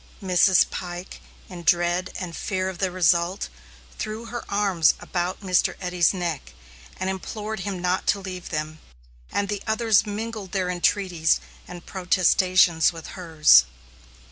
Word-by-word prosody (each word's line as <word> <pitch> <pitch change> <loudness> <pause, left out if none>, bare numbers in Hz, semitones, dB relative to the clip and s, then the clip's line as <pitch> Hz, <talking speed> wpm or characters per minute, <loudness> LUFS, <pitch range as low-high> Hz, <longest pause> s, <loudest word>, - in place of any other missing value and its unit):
Mrs. 185 -1 +4
Pike, 175 0 -7 0.3
in 180 -2 -9
dread 175 +2 +1
and 175 -3 -6
fear 185 -1 -2
of 185 - -8
the 190 - +1
result, 175 +1 +1 0.5
threw 215 +2 -5
her 240 +1 -6
arms 195 -6 +2
about 180 +1 -3
Mr. 185 -2 +1
Eddy's 180 -2 +2
neck 175 -6 -4 0.5
and 185 - -2
implored 210 +3 -4
him 195 0 -4
not 180 +1 -1
to 200 - +2
leave 185 -2 -7
them, 155 0 -4 0.5
and 200 - -1
the 205 0 -3
others 220 -1 +2
mingled 210 -2 -5
their 185 -2 0
entreaties 175 -2 +1 0.3
and 175 -1 -10
protestations 185 -2 +3
with 165 -2 -10
hers. 155 - +5
185 Hz, 140 wpm, -24 LUFS, 175-200 Hz, 0.5 s, hers